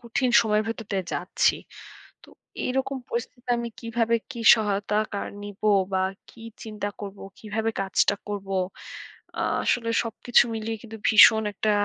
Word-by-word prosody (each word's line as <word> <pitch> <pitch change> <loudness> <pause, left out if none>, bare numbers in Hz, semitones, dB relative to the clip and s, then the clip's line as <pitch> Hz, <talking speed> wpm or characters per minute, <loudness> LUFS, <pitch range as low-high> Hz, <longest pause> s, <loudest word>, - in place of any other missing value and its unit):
কঠিন 240 +2 -1
সময়ের 215 -1 +1
ভেতর 225 -1 -5
দিয়ে 190 -2 -1
যাচ্ছি। - - +1 0.7
তো - - -18 0.4
এই - - -1
রকম 270 +1 -2
পরিস্থিতিতে 240 +1 -5
আমি 235 0 -3
কীভাবে 230 0 0
কী 235 -4 -6 0.2
সহায়তা 210 -1 -1 0.2
কার 200 - -3
নিব? 205 0 -10 0.3
বা, 190 0 +1 0.3
কী 230 - -15 0.2
চিন্তা 210 -2 -4
করবো? 200 -1 -8 0.2
কীভাবে 220 +1 -2
কাজটা 195 +1 +2
করবো? 195 -1 -4 0.9
আ - - +1 0.2
আসলে 230 -2 +1
সবকিছু 235 +2 +3
মিলিয়ে 225 0 -3
কিন্তু 225 -1 -10
ভীষণ 220 0 +8
একটা 215 +2 -1
220 Hz, 145 wpm, -25 LUFS, 205-235 Hz, 0.9 s, ভীষণ